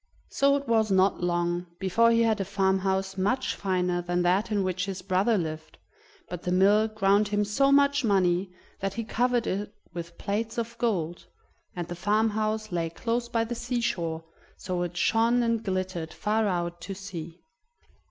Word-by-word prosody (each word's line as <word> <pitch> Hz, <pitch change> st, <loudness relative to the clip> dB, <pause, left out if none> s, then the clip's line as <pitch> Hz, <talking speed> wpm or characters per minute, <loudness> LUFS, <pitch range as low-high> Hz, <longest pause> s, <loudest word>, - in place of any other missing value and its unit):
So 280 Hz, 0 st, +3 dB
it 280 Hz, -1 st, -3 dB
was 220 Hz, -2 st, +2 dB
not 190 Hz, 0 st, +3 dB
long 175 Hz, 0 st, 0 dB
before 200 Hz, +5 st, +3 dB
he 230 Hz, 0 st, +4 dB
had 220 Hz, -2 st, +1 dB
a -, -, +1 dB
farmhouse 190 Hz, 0 st, 0 dB
much 250 Hz, +8 st, 0 dB
finer 180 Hz, -2 st, 0 dB
than 175 Hz, 0 st, -1 dB
that 190 Hz, +5 st, +2 dB
in 205 Hz, -2 st, +1 dB
which 185 Hz, +1 st, -2 dB
his 190 Hz, -2 st, -5 dB
brother 195 Hz, +4 st, +2 dB
lived, 160 Hz, -2 st, -5 dB, 0.5 s
but 180 Hz, -1 st, -6 dB
the 180 Hz, -, -3 dB
mill 200 Hz, +4 st, +4 dB
ground 205 Hz, -1 st, +2 dB
him 205 Hz, 0 st, 0 dB
so 275 Hz, +7 st, +2 dB
much 280 Hz, 0 st, +4 dB
money 185 Hz, -3 st, +2 dB, 0.3 s
that 195 Hz, 0 st, -3 dB
he 230 Hz, -, -2 dB
covered 240 Hz, +1 st, +1 dB
it 205 Hz, +2 st, -2 dB, 0.2 s
with 170 Hz, 0 st, -7 dB
plates 220 Hz, +3 st, -3 dB
of 235 Hz, 0 st, -3 dB
gold; 175 Hz, -8 st, -1 dB, 0.5 s
and 175 Hz, -2 st, -4 dB
the 175 Hz, -, -5 dB
farmhouse 215 Hz, +3 st, 0 dB
lay 170 Hz, -2 st, -1 dB
close 235 Hz, +7 st, -2 dB
by 230 Hz, -1 st, +1 dB
the 230 Hz, +1 st, -4 dB
sea 240 Hz, +1 st, -2 dB
shore, 165 Hz, -7 st, -2 dB, 0.3 s
so 180 Hz, -1 st, -3 dB
it 175 Hz, 0 st, -4 dB
shone 230 Hz, +5 st, +3 dB
and 230 Hz, -1 st, 0 dB
glittered 185 Hz, -4 st, -3 dB
far 215 Hz, +1 st, +1 dB
out 175 Hz, -2 st, -2 dB
to 195 Hz, -, -6 dB
sea. 175 Hz, -3 st, -8 dB
195 Hz, 175 wpm, -27 LUFS, 180-225 Hz, 0.5 s, he